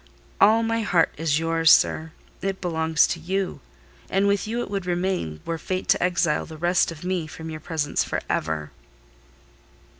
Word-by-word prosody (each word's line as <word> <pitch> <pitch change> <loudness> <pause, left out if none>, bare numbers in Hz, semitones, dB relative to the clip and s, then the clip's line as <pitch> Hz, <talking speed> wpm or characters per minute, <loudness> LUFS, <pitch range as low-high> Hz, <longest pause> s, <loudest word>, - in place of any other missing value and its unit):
All 220 +3 +6
my 225 0 0
heart 180 -6 +2
is 155 -1 0
yours, 165 0 +2
sir: 160 0 +3 0.3
it 195 0 -2
belongs 160 -2 +2
to 170 - -3
you; 190 +3 -2 0.5
and 195 +1 +2
with 200 +1 +1
you 235 +2 -2
it 205 - -6
would 195 -3 -3
remain, 175 - -2
were 165 -1 -3
fate 185 +2 -3
to - - +4
exile 175 -4 +1
the 160 - -9
rest 175 +2 +2
of 160 0 -10
me 180 -3 -2
from 160 +1 -8
your 155 - -6
presence 155 -2 -1
for - - -2
ever." 75 -1 -2
175 Hz, 175 wpm, -24 LUFS, 160-190 Hz, 0.5 s, All